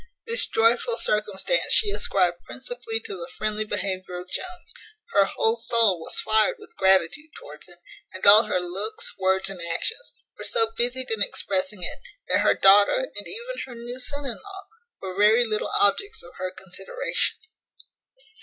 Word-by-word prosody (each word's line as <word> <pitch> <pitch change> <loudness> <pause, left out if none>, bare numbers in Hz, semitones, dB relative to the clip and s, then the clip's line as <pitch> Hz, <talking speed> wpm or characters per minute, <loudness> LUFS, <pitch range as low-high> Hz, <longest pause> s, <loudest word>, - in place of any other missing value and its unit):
This 470 0 +2
joyful 230 +1 +1
circumstance 215 - +1
she 415 - +4
ascribed 180 - +1
principally 455 -2 -5
to 445 -2 -8
the 260 -7 -8
friendly 215 0 -2
behaviour 185 -3 -4
of 180 +1 -12
Jones, 360 -1 -7 0.4
her 200 -1 +4
whole 225 +4 0
soul 230 -5 +3
was 160 - -1
fired 220 -1 +2
with - - -17
gratitude 190 - +2
towards 150 +3 -12
him, 175 -1 -18 0.3
and 185 - -7
all 210 +3 +10
her 185 - -1
looks, 190 +5 -3
words, 190 0 +1
and 185 -3 -8
actions, 170 - -2 0.2
were - - -7
so 225 0 +1
busied 250 +2 -1
in 220 -2 -2
expressing 190 -1 -1
it, - - -5 0.3
that - - +3
her - - +3
daughter, 205 - +4
and - - -4
even 475 +4 -6
her 250 - -10
new 240 +2 -7
son 285 +2 0
in 250 - -3
law, 390 -1 -11 0.4
were 185 -1 -6
very 215 +4 +4
little 215 -2 -2
objects 400 - +1
of 175 - -15
her 185 - -4
consideration. 190 - -4
215 Hz, 165 wpm, -24 LUFS, 190-260 Hz, 0.4 s, all